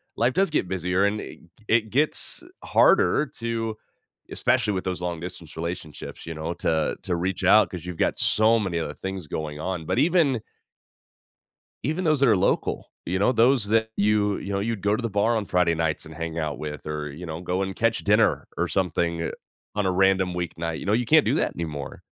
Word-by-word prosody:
life 120 +2 +2
does 195 +4 +2
get 150 -11 0
busier, 90 +1 +1
and 105 +1 0
i - - -6
g - - -12 0.3
it 110 -1 +2
gets 150 - +1 0.2
harder 150 - +4 0.2
to 115 -1 -2 0.5
especially 105 - +1
with 95 - -3
those 90 -1 -3
long-distance 85 -1 -5
relationships, 85 -2 -6
you 80 - -5
know, 80 +2 -4
to 80 -2 +1
to 90 - 0
reach 90 +3 -2
out, 105 +3 +6
‘cause 90 -3 -7
you've 90 -2 -6
got - - -4
so 110 +2 +4
many 95 -5 -1
other 75 -2 -4
things 95 -4 -5
going 75 0 -5
on, 90 0 -3
but 120 - 0
even 150 -6 +3 1.4
even 155 +7 -1
those 155 -4 +2
that 135 - +5
are 105 - +5
local, 95 - 0
you 90 +2 -1
know, 100 - +3
those 120 -1 +4
that 110 +1 +2
you 105 -1 +2
you 95 - -6
know, 100 - 0
you'd 110 +1 -2
go 105 +1 +2
to 125 - -5
the 115 - -1
bar 105 +4 +2
on 110 - -1
Friday 90 -2 +2
nights 80 0 -1
and 80 - -10
hang 80 +1 -4
out 75 -3 -2
with 75 0 -6
or, 75 -1 -4
you 85 +5 -8
know, 80 0 -5
go 90 +1 -1
and 95 -1 -4
catch 115 0 +2
dinner 105 +2 +3
or - - 0
something, 85 -2 0
uh, - - -2 0.5
on 105 - +1
a - - +2
random 95 0 +3
weeknight, 85 -1 -3
you - - -7
know, 100 - +2
you 120 +2 +1
can't 155 +6 +5
do - - +2
that - - 0
anymore. 75 -5 -5
95 Hz, 210 wpm, -25 LUFS, 85-110 Hz, 1.4 s, out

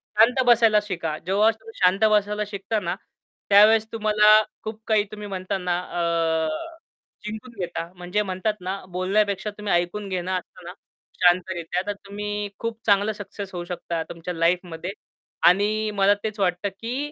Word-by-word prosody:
शांत 235 +5 +5
बसायला 230 -3 +5
शिका. 170 -6 -3
जेव्हा 200 +4 +4
तुम्ही 225 0 -14
शांत 185 +3 +3
बसायला 210 0 +2
शिकता 205 +2 -2
ना, - - -3 0.5
त्यावेळेस 215 +2 +7
तुम्हाला 215 -1 +5 0.2
खूप 220 0 -6
काही 215 -2 +3
तुम्ही 210 -1 -7
म्हणता 190 0 -3
ना 180 -1 -1
अ, 165 -2 0 0.8
जिंकून 220 +4 -6
घेता 170 -1 -3
म्हणजे 180 +3 -1
म्हणतात 195 +2 -1
ना 190 +2 -3
बोलण्यापेक्षा 195 +2 0
तुम्ही 210 -1 -2
ऐकून 175 +4 0
घेणं 185 -1 -2
असतं 185 0 -5
ना, 175 - -7 0.5
शांतरित्या, 180 -1 +2
तर 205 - 0
तुम्ही 205 +1 -4
खूप 230 -1 -4
चांगला 205 +1 +3
सक्सेस 205 -1 -8
होऊ 175 -1 -4
शकता 170 -2 -4
तुमच्या 170 +1 -6
लाईफमध्ये 170 +1 -1 0.6
आणि 210 +4 +3
मला 200 0 +5
तेच 215 -1 -4
वाटतं, 185 +1 0
की 245 +9 -5
200 Hz, 150 wpm, -24 LUFS, 180-215 Hz, 0.8 s, त्यावेळेस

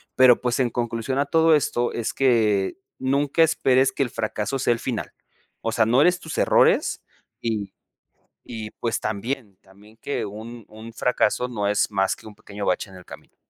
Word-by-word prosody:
Pero, 130 -2 +6
pues, 125 +1 -1
en 125 -2 +2
conclusión 120 +2 -2
a 145 - +2
todo 160 0 +4
esto, 120 -4 0
es 115 - -3
que 110 -7 +2 0.2
nunca 140 +4 +1
esperes 130 -4 +3
que 140 - 0
el 120 - -3
fracaso 110 +4 -3
sea 120 - +2
el 115 - -5
final, 120 -4 -4 0.5
o 115 - -2
sea, 110 -1 +2
no 125 +4 +4
eres 180 +3 +4
tus 160 - -7
errores. - - +3 0.4
Y 105 -4 -3 0.7
y 110 -2 -7
pues 115 -2 -2
también 110 0 -4
también 100 +3 -20
que 145 - -3
un 110 +2 -9
un 110 +2 -11
fracaso 125 0 +1
no 110 -5 -3
es 105 0 +1
más 95 -1 +1
que - - -14
un 105 - -12
pequeño 100 0 -7
bache 90 +2 -1
en 95 - -13
el 90 - -14
camino. - - -14
115 Hz, 185 wpm, -23 LUFS, 105-130 Hz, 0.7 s, Pero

